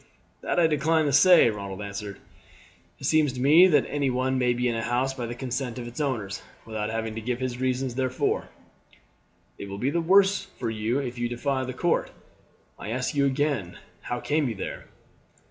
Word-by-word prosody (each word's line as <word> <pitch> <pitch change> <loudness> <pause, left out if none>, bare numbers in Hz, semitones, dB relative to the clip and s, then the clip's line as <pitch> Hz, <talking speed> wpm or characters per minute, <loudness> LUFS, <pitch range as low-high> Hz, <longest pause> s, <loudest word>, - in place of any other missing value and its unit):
"That - - 0
I 170 - +5
decline 160 +1 +2
to 140 - 0
say," 145 -3 +7
Ronald 100 -2 -6
answered. 100 0 -6 0.8
"It - - -15
seems 155 -4 +3
to 125 - -6
me 155 +8 +7
that 150 -7 +3
any 145 -2 0
one 130 +1 0
may 125 -1 +2
be 125 +1 0
in 120 - 0
a 115 - -2
house 125 +3 0
by 125 -3 -5
the 120 - -5
consent 125 0 -4
of 120 - -5
its 120 +6 -6
owners, 110 -9 -2 0.2
without 110 -1 -3
having 110 0 -3
to 115 - -5
give 120 +2 -2
his 125 -1 -3
reasons 130 0 -1
therefor." 130 0 -1 1.1
"It 100 - -7
will 100 - -6
be 130 +7 0
the 170 +2 0
worse 195 +3 +4
for 115 -3 -2
you 110 +3 -1
if 125 -3 -4
you 120 0 -1
defy 130 +2 -1
the 130 - -5
court. 170 +7 0 0.7
I - - -6
ask 125 +5 -2
you 140 -1 +2
again 135 - -1 0.2
how 120 - -4
came 150 -1 0
you 115 - -4
there?" 95 - -6
125 Hz, 200 wpm, -26 LUFS, 115-145 Hz, 1.1 s, say